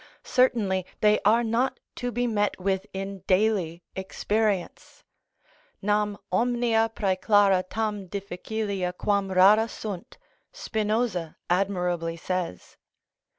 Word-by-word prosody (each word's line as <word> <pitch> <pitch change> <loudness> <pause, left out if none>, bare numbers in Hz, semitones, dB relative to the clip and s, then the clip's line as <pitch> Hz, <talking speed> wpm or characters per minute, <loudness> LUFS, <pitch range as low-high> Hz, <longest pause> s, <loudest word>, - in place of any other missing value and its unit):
Certainly 215 -8 +2
they 210 0 +5
are 230 +3 +5
not 235 +3 0 0.2
to 245 0 -2
be 245 +1 0
met 210 -4 0
with 190 0 -1
in 195 0 -5
daily 185 -4 +1
experience: 200 0 -2 0.8
Nam 210 0 0
omnia 230 +1 +2
præclara 195 -1 +3
tam 210 -3 -2
difficilia 200 -1 -3
quam 200 -2 0
rara 200 +4 +6
sunt, 205 -5 -7 0.3
Spinoza 215 - -1 0.2
admirably 180 -3 0
says. 180 - -4
200 Hz, 100 wpm, -26 LUFS, 185-220 Hz, 0.8 s, rara